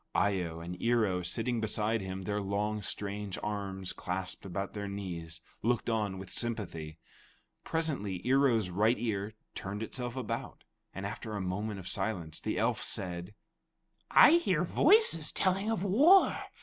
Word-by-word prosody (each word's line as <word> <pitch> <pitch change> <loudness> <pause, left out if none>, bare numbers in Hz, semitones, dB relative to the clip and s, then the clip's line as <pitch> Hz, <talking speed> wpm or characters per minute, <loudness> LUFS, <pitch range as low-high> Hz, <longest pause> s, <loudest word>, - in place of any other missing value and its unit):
Eye 100 -2 +2
o 85 -1 -5
and 90 +1 -7
Ear 115 -1 +3
o 90 -2 -1
sitting 115 +7 -1
beside 110 0 +1
him, 95 0 -5
their 105 +2 -1
long, 105 +2 -1
strange 100 0 -4
arms 100 -3 -3
clasped 95 +2 -3
about 95 +2 -4
their 100 -1 -4
knees, 85 -5 -5 0.2
looked 120 0 +1
on 105 -4 -1
with 95 0 -8
sympathy. 85 -10 -3 0.7
Presently 140 - -1
Ear 135 +2 +5
o's 110 -7 +1
right 110 +6 +3
ear 110 -2 -2 0.2
turned 100 +3 -4
itself 120 +1 -4
about, 130 -4 -4 0.3
and 95 - -6
after 110 +2 -5
a - - -2
moment's 95 0 -3
silence, 85 -8 -3
the - - -2
elf - - +1
said: 90 +2 -2 0.7
"I 315 +3 +8
hear 340 - +1
voices 285 - +4
telling 195 +2 +1
of 225 -5 0
war. 295 - +6
105 Hz, 150 wpm, -31 LUFS, 95-115 Hz, 0.7 s, I